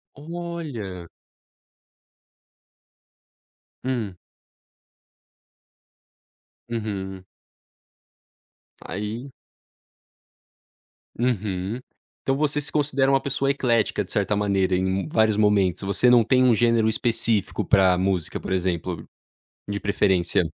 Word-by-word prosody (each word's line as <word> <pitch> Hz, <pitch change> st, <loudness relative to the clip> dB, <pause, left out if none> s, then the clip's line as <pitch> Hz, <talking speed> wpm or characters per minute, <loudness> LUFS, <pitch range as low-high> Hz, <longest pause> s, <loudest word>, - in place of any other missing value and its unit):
Olha. 150 Hz, -, -6 dB, 2.8 s
Hum. 120 Hz, -7 st, -2 dB, 2.5 s
Uhum. 95 Hz, -5 st, -4 dB, 1.6 s
Aí 110 Hz, +7 st, -5 dB, 1.9 s
Uhum. 105 Hz, -3 st, -1 dB, 0.4 s
Então 135 Hz, -, +1 dB
você 150 Hz, 0 st, 0 dB
se 145 Hz, +1 st, -4 dB
considera 140 Hz, -2 st, +2 dB
uma 135 Hz, -1 st, +3 dB
pessoa 135 Hz, 0 st, 0 dB
eclética, 120 Hz, -5 st, +1 dB
de -, -, -12 dB
certa 105 Hz, -, +1 dB
maneira, 100 Hz, -2 st, +1 dB
em 95 Hz, 0 st, 0 dB
vários 110 Hz, +4 st, +3 dB
momentos, 105 Hz, -3 st, +2 dB
você 100 Hz, +5 st, +3 dB
não 120 Hz, -1 st, +6 dB
tem 130 Hz, +3 st, +3 dB
um 125 Hz, -2 st, +5 dB
gênero 115 Hz, -1 st, +3 dB
específico 115 Hz, -2 st, 0 dB
pra 95 Hz, -2 st, +4 dB
música, 95 Hz, -4 st, -1 dB
por -, -, -7 dB
exemplo, 90 Hz, -1 st, -2 dB, 0.6 s
de 100 Hz, 0 st, -2 dB
preferência. 95 Hz, -4 st, +2 dB
110 Hz, 90 wpm, -24 LUFS, 95-130 Hz, 2.8 s, não